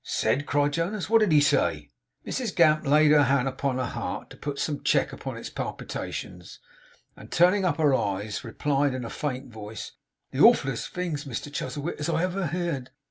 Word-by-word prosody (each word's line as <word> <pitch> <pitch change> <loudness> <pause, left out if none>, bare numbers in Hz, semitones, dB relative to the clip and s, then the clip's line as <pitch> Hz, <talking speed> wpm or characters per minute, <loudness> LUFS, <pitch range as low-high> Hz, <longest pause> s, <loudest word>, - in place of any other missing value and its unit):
'Said!' 145 +3 0
cried 145 0 +1
Jonas. 185 +5 -2
'What 225 - +7
did 215 -5 +2
he 150 - +6
say?' 145 - +1 0.3
Mrs 245 -7 -3
Gamp 155 -3 +4
laid 150 +1 +5
her 145 -2 +6
hand 135 -1 +2
upon 135 0 -1
her 130 - -1
heart, - - -5
to - - -10
put 145 -1 -5
some 145 -1 -2
check - - +1
upon - - -6
its - - -7
palpitations, 90 -1 -6 0.6
and - - -14
turning 185 +3 +4
up 165 -5 +1
her 150 -4 +3
eyes 105 +2 -1
replied 140 +3 0
in 125 -2 -4
a - - -6
faint 135 -3 -4
voice: 110 0 -7 0.4
'The - - -5
awfulest 135 -3 +4
things, 165 -5 -3
Mr 140 +2 -6
Chuzzlewit, 150 +2 -4
as 150 - -2
ever 180 +4 0
I 180 - 0
heerd! 160 -5 -3
145 Hz, 190 wpm, -26 LUFS, 130-170 Hz, 0.6 s, What